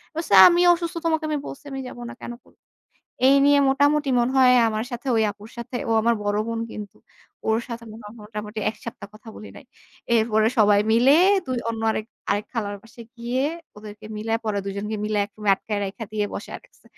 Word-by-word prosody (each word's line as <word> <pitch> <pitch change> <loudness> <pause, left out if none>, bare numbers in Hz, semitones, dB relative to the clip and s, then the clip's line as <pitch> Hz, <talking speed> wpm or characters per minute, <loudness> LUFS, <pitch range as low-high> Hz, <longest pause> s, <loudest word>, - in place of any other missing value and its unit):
বলছি, 325 -8 -5 0.2
"আমি 345 0 +3
অসুস্থ, 340 -1 -4
তোমাকে 320 -1 +1
আমি 305 - 0
বলছি 280 - -10
আমি 270 - -5
যাব 250 - -10
না - - -8
কেনো?" 240 - -7 0.9
এই 275 - +6
নিয়ে 285 0 +5
মোটামুটি 285 +1 +2
মনে 240 +2 0
হয় 250 -1 +6 0.2
আমার 220 +1 -2
সাথে 240 +3 -7
ওই 220 - +3
আপুর 210 +2 -14
সাথে 235 +1 -6
ও - - +3
আমার 235 +1 +3
বড় 205 0 0
বোন 230 0 -3
কিন্তু 210 -2 -9 0.5
ওর 220 - +3
সাথে 235 -1 -7 0.4
মোটামুটি 210 0 -7
১ 215 - -15
সপ্তাহ 230 - -8
কথা 220 +1 -15
বলি 215 - -10
নাই। - - -13 0.5
এরপরে 220 -1 +3
সবাই 205 -1 +5
মিলে 255 +6 +5 0.3
দু - - -6 0.2
অন্য 225 0 -5
আরেক 215 0 -3 0.2
আরেক 205 +1 0
খালার 205 -4 -3
বাসায় 225 0 -14
গিয়ে 245 +3 -2 0.3
ওদেরকে 210 0 -11
মিলায়ে, 225 +2 -2
পরে 210 -2 -1
২ 200 - -4
জনকে 210 +2 -4
মিলায়ে 210 -1 0
এক 205 - -36 0.2
আটকায় 210 +1 -4
রাইখা 205 +4 -6
দিয়ে 210 -1 0
বসায়ে - - -6
রাখছে। - - -26
225 Hz, 195 wpm, -23 LUFS, 210-255 Hz, 0.9 s, এই